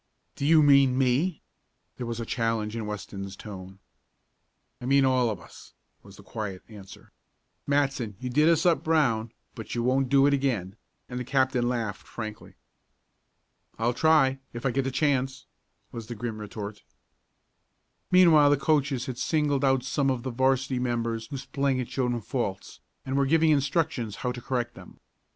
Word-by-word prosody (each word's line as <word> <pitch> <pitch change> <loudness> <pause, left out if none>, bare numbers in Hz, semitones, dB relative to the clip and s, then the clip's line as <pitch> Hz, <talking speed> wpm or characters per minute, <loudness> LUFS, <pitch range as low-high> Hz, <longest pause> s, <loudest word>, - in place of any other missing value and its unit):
"Do 140 - -2
you 160 -1 +6
mean 140 -3 +5
me?" 135 +7 +1 0.5
There 125 - -5
was 115 0 -4
challenge 115 -2 -1
in 110 -2 -4
Weston's 100 -2 -6
tone. 95 -2 -10 1.0
"I - - -6
mean 135 0 +4
all 130 -2 +2
of 105 -4 -4
us," - - -15 0.3
was - - -15
the - - -14
quiet 100 -4 -6
answer. 100 -4 -13 0.6
"Matson, 135 -7 0
you 125 - -5
did 150 +5 +4
us 165 0 +2
up 170 -2 +3
brown, 115 -9 +1 0.2
but 110 - -7
you 120 - -1
won't 130 +1 +1
do 135 0 +5
it 145 - +4
again," 120 -9 -1 0.3
and 125 0 -5
the - - -3
captain 130 -1 +1
laughed 110 -6 -3
frankly. 110 -2 -8 1.2
"I'll 115 +2 +1
try 135 -2 +3
if 120 +2 -7
I 135 - +2
get 135 +2 -1
the - - 0
chance," 135 -2 0 0.5
was 115 -2 -7
the 120 - -6
grim 110 0 -5
retort. 105 0 -7 1.3
Meanwhile 165 -5 +6
the 145 - +4
coaches 140 -3 +1
had 130 -3 -6
singled 145 -1 +1
out 135 -2 +3
some 135 +1 0
of 125 -3 -1
the 130 - -3
'varsity 130 +1 +1
members 115 -2 -2
whose 135 0 -7
playing 140 -2 0
had 125 -2 -4
shown 125 -2 -1
faults, 105 -4 -4 0.3
and 130 - -3
were 140 0 +2
giving 160 +2 +4
instructions 140 - 0
how 125 - +1
to 125 0 -7
correct 120 -1 -2
them. - - -14
130 Hz, 170 wpm, -27 LUFS, 115-140 Hz, 1.3 s, you